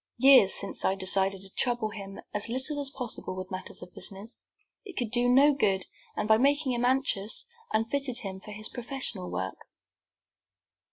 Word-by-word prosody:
Years 260 -6 +7
since 200 - -1
I 190 - +2
decided 190 0 +2
to 195 0 -8
trouble 240 -3 0
him 195 -2 -8
as 210 +2 -1
little 265 +4 +1
as 275 - 0
possible 250 -8 -3
with 185 +1 -7
matters 185 -1 -5
of 180 - -13
business. 200 +4 -6 0.4
It 390 -5 -11
could 235 -3 -2
do 245 0 +3
no 280 +4 +6
good, 195 -8 +1 0.3
and, - - -1
by 220 0 +5
making 285 +1 +2
him 240 -1 -1
anxious, 260 - 0 0.3
unfitted 245 +3 0
him 190 -2 -6
for 210 - -12
his 215 +1 -4
professional 240 -7 -4
work." 95 0 -5
225 Hz, 170 wpm, -28 LUFS, 195-265 Hz, 0.4 s, Years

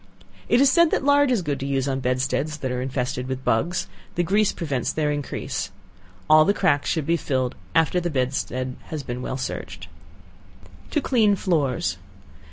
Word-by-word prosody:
It 240 - +4
is 275 0 +5
said 340 +3 +5
that - - 0
lard 285 -1 +5
is 235 -7 +1
good 145 -4 -2
to 135 - -4
use 135 -1 0
on 135 -1 -1
bedsteads 130 +4 -1
that 130 -3 -3
are 125 0 -2
infested 125 -1 -2
with 130 0 -5
bugs; 175 +11 +1 0.3
the 175 - +1
grease 200 +4 +2
prevents 140 -8 -2
their 150 -1 0
increase. 145 -1 -3 0.6
All 155 0 +7
the 200 +5 +2
cracks 145 -8 +2
should 160 -3 0
be 170 +2 +2
filled 130 -5 -1 0.2
after 165 +2 +3
the 175 0 -2
bedstead 130 -2 -2
has 155 -3 -5
been 125 0 -5
well 130 - -3
searched. 130 - -6 1.0
To 300 - 0
Clean 220 -7 +3
Floors. 155 - 0
145 Hz, 175 wpm, -24 LUFS, 130-180 Hz, 1.0 s, All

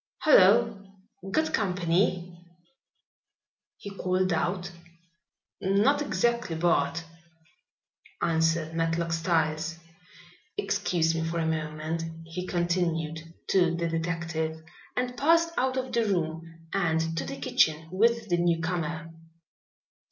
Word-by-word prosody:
"Hullo! 220 - +5 0.5
got 315 +10 0
company?" 180 -2 0 1.4
he 200 - -8
called 185 -1 0
out. 175 +2 -1 0.9
"Not 210 +10 +3
exactly, 235 - 0
Bart," 165 -1 +1 1.2
answered 165 -1 +1
Matlock 165 0 0
Styles. 165 -1 0 0.8
"Excuse 180 - +1
me 165 0 -1
for 165 +1 -2
a 165 - 0
moment," 155 +1 -2 0.2
he 180 +3 -6
continued, 170 -3 0 0.3
to 175 -3 +3
the 170 0 -1
detective, 165 -1 -2 0.3
and 250 0 -1
passed 330 +5 +3
out 260 +1 0
of 255 -1 -3
the 235 -1 +2
room 165 -3 -3
and 165 -4 0
to 150 - -1
the - - -6
kitchen 155 0 +2
with 230 +3 +2
the 175 -3 +1
newcomer. 165 -1 -1
170 Hz, 105 wpm, -28 LUFS, 165-195 Hz, 1.4 s, Hullo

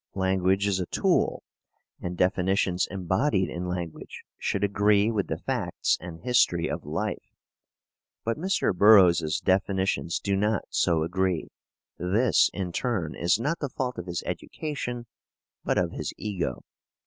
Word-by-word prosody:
Language 95 +1 +1
is 100 -2 +1
a 90 - -2
tool, - - +1 0.6
and 90 0 -4
definitions 90 0 +1
embodied 95 - 0
in 90 +1 -4
language 90 -3 -6 0.2
should 100 - -1
agree 105 +1 +3
with 105 -4 -1
the - - -2
facts - - -1
and 85 -1 -8
history 120 -9 +2
of - - -4
life. - - -4 0.9
But 115 0 -1
Mr. 185 - 0
Burroughs's 90 -6 +6
definitions 95 -2 0
do 100 -1 -1
not 105 +1 +1
so 80 -2 +2
agree. 90 0 -1 0.5
This, 105 +8 +3
in 90 -3 -4
turn, 95 -7 -2
is 90 +5 +1
not 150 +8 -1
the 145 - -3
fault 125 -3 -3
of 90 - -7
his 85 -1 -3
education, 125 -6 -4 0.6
but - - 0
of - - +1
his - - -4
ego. 95 -11 -3
95 Hz, 140 wpm, -27 LUFS, 90-110 Hz, 0.9 s, Burroughs's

